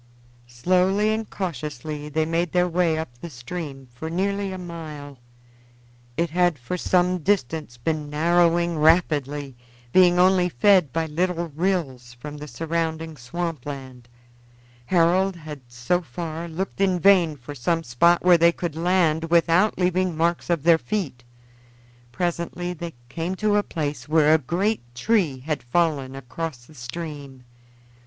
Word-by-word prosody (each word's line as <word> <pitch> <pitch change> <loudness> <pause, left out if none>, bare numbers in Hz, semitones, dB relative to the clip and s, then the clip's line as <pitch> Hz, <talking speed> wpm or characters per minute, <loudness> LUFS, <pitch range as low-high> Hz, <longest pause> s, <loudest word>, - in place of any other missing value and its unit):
Slowly 185 - +2
and 220 0 -3
cautiously 150 -3 -5
they 155 +1 0
made 165 +1 -1
their 180 0 +3
way 170 -2 +1
up 120 -7 -6
the 170 - -7
stream 135 +1 -7
for 160 +6 -6
nearly 200 +3 -1
a 185 - -5
mile. 155 -6 -8 1.0
It 170 -2 0
had 175 -2 +2
for 125 +7 -4
some 180 0 +1
distance 160 -7 -1
been 150 +4 -2
narrowing 170 +2 +2
rapidly, 145 -4 +2 0.4
being 180 -1 +6
only 180 0 +4
fed 180 +1 +4
by 165 +3 -1
little 170 +2 -1
rills 145 -7 -2
from 145 +5 -8
the 150 +1 -8
surrounding 160 0 -3
swamp 155 +3 -4
land. 130 -4 -8 0.8
Harold 185 +2 +3
had 155 -4 -9
so 125 +9 -1
far 165 +3 -6
looked 185 +4 -4
in 185 -2 +2
vain 175 -4 +4
for 135 +3 -9
some 165 +5 -1
spot 170 +8 +3
where 175 -2 +6
they 170 +1 +6
could 170 -2 -5
land 165 -2 +2
without 170 +4 +3
leaving 180 -2 +1
marks 170 +2 0
of 170 -5 +1
their 165 -1 +5
feet. 160 -14 -3 0.9
Presently 175 +1 -3
they 170 -2 -7
came 170 +7 -3
to 210 +1 +1
a 205 - +4
place 150 -6 -4
where 155 -1 +5
a 160 - +5
great 190 - -1
tree 160 - +1
had 150 -1 -3
fallen 135 0 0
across 135 0 -6
the 155 - -17
stream. 140 0 -8
165 Hz, 145 wpm, -24 LUFS, 145-180 Hz, 1.0 s, being